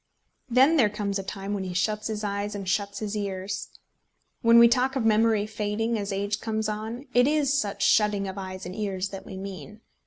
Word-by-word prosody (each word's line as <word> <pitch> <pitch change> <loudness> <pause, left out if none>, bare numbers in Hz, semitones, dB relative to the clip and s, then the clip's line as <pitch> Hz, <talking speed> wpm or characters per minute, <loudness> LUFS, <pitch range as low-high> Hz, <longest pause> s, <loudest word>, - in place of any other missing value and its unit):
Then 265 +7 +5
there 230 -7 +5
comes 205 -1 -2
a - - -4
time 195 +1 -5
when 200 -2 -2
he 185 -1 -5
shuts 210 +3 0
his 215 -1 -4
eyes 205 0 -2
and 195 -2 -6
shuts 200 +1 -1
his 215 0 -4
ears. 195 -1 -4 0.7
When 230 -1 +6
we 235 0 +9
talk 255 +3 +1
of 255 -4 0
memory 220 -1 +3
fading 215 +2 -2
as 200 0 -3
age 200 +1 -2
comes 220 -1 -2
on, 220 +5 -5
it 245 +1 +5
is 295 -2 +2
such 210 -9 0
shutting 210 -2 +3
of 190 - -5
eyes 185 -1 -6
and 180 +1 -6
ears 195 -3 -2
that 195 -1 -9
we 190 - -7
mean. 195 +1 -8
210 Hz, 210 wpm, -26 LUFS, 195-225 Hz, 0.7 s, we